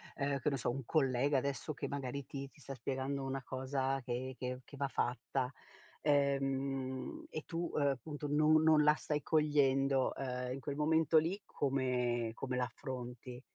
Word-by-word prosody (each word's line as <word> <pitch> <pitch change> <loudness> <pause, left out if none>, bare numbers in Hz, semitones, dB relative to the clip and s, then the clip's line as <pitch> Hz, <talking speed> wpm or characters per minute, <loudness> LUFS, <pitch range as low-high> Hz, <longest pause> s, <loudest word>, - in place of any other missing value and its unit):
ehm, 140 -1 0
che 150 - +1
ne 140 - -1
so, 120 - -1
un 135 +2 -2
collega 135 -1 +2
adesso 140 +3 -2
che - - -4
magari 140 -1 -3
ti 140 -1 -6
ti - - -23
sta 135 - -6
spiegando 135 +1 -2
una 135 0 -2
cosa 135 +1 -1
che 125 +1 -3
che 125 0 -3
che 140 - -12
va 140 0 0
fatta, 125 +1 -1 0.5
ehm, 135 -2 0
e 155 - -5
tu, 170 0 -3
appunto, 145 +1 -1
no 155 +1 +5
non 155 -1 +5
la 150 +1 +6
stai 150 -1 -2
cogliendo, 135 -3 +3
ehm, 125 -1 -3
in 135 - -5
quel 140 0 -3
momento 160 +1 +4
lì 175 +6 +2
come 125 -4 0
come 125 +1 -3
l'affronti? 125 0 -5
135 Hz, 165 wpm, -35 LUFS, 130-145 Hz, 0.5 s, la